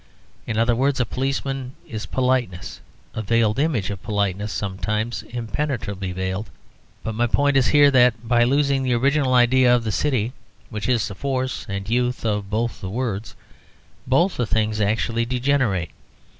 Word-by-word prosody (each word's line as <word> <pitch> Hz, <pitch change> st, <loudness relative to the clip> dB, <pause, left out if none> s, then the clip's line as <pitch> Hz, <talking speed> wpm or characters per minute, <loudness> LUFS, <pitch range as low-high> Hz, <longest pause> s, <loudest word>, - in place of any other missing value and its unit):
In 110 Hz, -, -2 dB
other 115 Hz, +1 st, +3 dB
words, 135 Hz, +2 st, +1 dB
a 120 Hz, -, +2 dB
policeman 135 Hz, +1 st, -3 dB
is 110 Hz, -1 st, -6 dB
politeness; 125 Hz, -8 st, -1 dB, 0.3 s
a 110 Hz, -, -3 dB
veiled 110 Hz, +2 st, +1 dB
image 130 Hz, -, 0 dB
of 100 Hz, -2 st, -6 dB
politeness 105 Hz, -1 st, -1 dB
sometimes 100 Hz, +4 st, -2 dB
impenetrably 115 Hz, -4 st, -3 dB
veiled. 95 Hz, +3 st, -3 dB, 0.5 s
But 110 Hz, -, -3 dB
my 120 Hz, +2 st, +1 dB
point 145 Hz, +4 st, +2 dB
is 130 Hz, -2 st, +4 dB
here 145 Hz, -1 st, +6 dB
that 125 Hz, -3 st, +3 dB
by 120 Hz, 0 st, +4 dB
losing 140 Hz, +2 st, +2 dB
the 130 Hz, -2 st, +1 dB
original 135 Hz, +1 st, +2 dB
idea 125 Hz, 0 st, +5 dB
of 120 Hz, -, 0 dB
the 110 Hz, -, -2 dB
city, 125 Hz, -1 st, 0 dB, 0.4 s
which 110 Hz, +3 st, -3 dB
is 115 Hz, -5 st, +2 dB
the 100 Hz, -, -6 dB
force 130 Hz, +3 st, -3 dB
and 100 Hz, 0 st, -4 dB
youth 125 Hz, +2 st, 0 dB
of 105 Hz, -2 st, -1 dB
both 115 Hz, +3 st, -2 dB
the 95 Hz, -, -4 dB
words, 110 Hz, -2 st, -3 dB, 0.7 s
both 170 Hz, +9 st, +2 dB
the 120 Hz, -, 0 dB
things 110 Hz, 0 st, 0 dB
actually 115 Hz, +3 st, +1 dB
degenerate. 120 Hz, -, 0 dB
120 Hz, 160 wpm, -22 LUFS, 105-130 Hz, 0.7 s, here